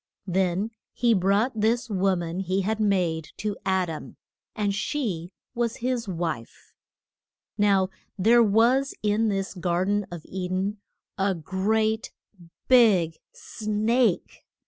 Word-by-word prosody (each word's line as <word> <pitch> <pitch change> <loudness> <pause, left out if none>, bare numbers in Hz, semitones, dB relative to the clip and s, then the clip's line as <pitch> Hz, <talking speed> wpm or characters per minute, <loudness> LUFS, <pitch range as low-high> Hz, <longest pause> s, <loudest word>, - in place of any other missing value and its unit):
Then 190 +3 0 0.2
he 240 -2 +3
brought 200 +5 +2
this 230 +3 +1
wo 195 -3 +1
man 170 0 -4
he 190 +1 0
had 215 +3 -1
made 180 -7 +1
to 210 -1 -2
Ad 190 -1 +2
am, 160 -2 -7 0.4
and 205 -2 0
she 200 - -2 0.2
was 235 -1 -1
his 245 -2 -2
wife. 165 -10 -5 0.8
Now 200 -2 +3 0.3
there 230 +5 +5
was 235 +6 +3
in 215 +1 +2
this 195 -1 -2
gar 175 0 0
den 205 0 0
of 175 -3 -8
E 185 -1 -4
den 190 +3 -2 0.4
a 195 0 +2
great 215 +6 0 0.6
big 200 -11 +5
snake. 215 0 -1
200 Hz, 125 wpm, -26 LUFS, 185-220 Hz, 0.8 s, there